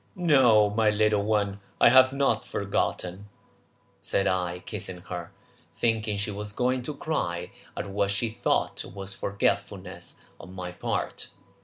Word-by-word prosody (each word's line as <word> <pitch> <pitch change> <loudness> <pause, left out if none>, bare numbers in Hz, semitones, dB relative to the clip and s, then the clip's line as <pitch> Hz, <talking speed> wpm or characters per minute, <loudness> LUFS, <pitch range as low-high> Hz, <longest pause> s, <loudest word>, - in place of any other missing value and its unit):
"No, 130 - +5
my 110 +1 +3
little 105 0 +3
one, 100 -2 0 0.2
I - - +8
have 130 +1 +7
not 135 -5 +1
forgotten 90 -3 -1
it," 95 - -13 0.8
said 100 - +1
I, 90 -1 -1
kissing 95 -4 -6
her, 90 -2 -6 0.5
thinking 110 -3 +1
she 105 +1 -2
was 105 +1 -6
going 125 +3 +1
to 145 +4 -5
cry 90 - -2 0.3
at - - -3
what 100 0 0
she 100 +4 0
thought 110 - 0
was 95 +1 -7
forgetfulness 100 0 -2 0.2
on 90 - -11
my 90 -1 -5
part. 90 - -3
105 Hz, 145 wpm, -27 LUFS, 95-115 Hz, 0.8 s, I